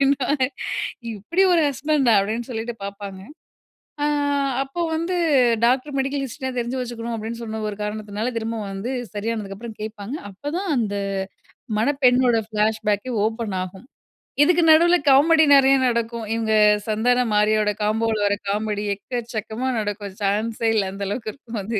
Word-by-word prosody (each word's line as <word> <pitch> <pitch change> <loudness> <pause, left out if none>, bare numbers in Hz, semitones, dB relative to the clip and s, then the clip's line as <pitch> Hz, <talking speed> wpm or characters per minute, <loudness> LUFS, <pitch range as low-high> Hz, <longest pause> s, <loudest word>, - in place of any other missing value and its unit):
அப்டின்பாரு 275 0 +2 0.7
"இப்டி 335 - 0
ஒரு 340 - +4
ஹஸ்பண்டா" 280 -3 +2
அப்டின்னு 225 +5 -3
சொல்லிட்டு 230 0 -4
பார்ப்பாங்க. 200 -1 -7 0.8
ஆ - - +3 0.6
அப்போ 275 +5 -8 0.2
வந்து 335 +3 -1 0.5
டாக்டர் 260 +4 +1
மெடிக்கல் 275 +1 -1
ஹிஸ்ட்ரி 265 +2 -7
யா - - -2
தெரிஞ்சு 245 +2 -2
வச்சுக்கணும். 235 -1 -4
அப்படின்னு 230 +2 -5
சொன்ன 220 -1 -5
ஒரு 205 - -6
காரணத்தினால 210 +2 -3
திரும்ப 225 0 -3
வந்து 195 +6 -4 0.2
சரியானதுக்கப்புறம் 215 0 -4
கேட்பாங்க. 215 +3 -6 0.2
அப்பதான் 310 - -4
அந்த 210 -4 -1 0.8
மணப்பெண்ணோட 250 -2 +3
ஃப்ளாஷ்பேக்கே 215 +1 0
ஓப்பன் 220 -3 -2
ஆகும். 190 +5 -10 0.6
இதுக்கு 350 +2 +4
நடுவுல 340 +3 +6
காமெடி 315 +4 +6
நெறையா 270 0 +6
நடக்கும். 235 -1 -2
இவங்க 225 -1 0 0.3
சந்தானம் 240 +2 +2
மாரியோட 210 0 +3
காம்போவுல 220 0 0
வர்ற 205 0 +1
காமெடி 210 0 -2
எக்கச்சக்கமா 230 +2 -4
நடக்கும். 205 -2 -4
சான்ஸே 220 +3 0
இல்ல 195 -3 +1
அந்த 200 0 -4
அளவுக்கு 220 +1 -3
இருக்கும். 235 -5 -7
அது. 215 +1 -2
230 Hz, 135 wpm, -22 LUFS, 210-260 Hz, 0.8 s, நடுவுல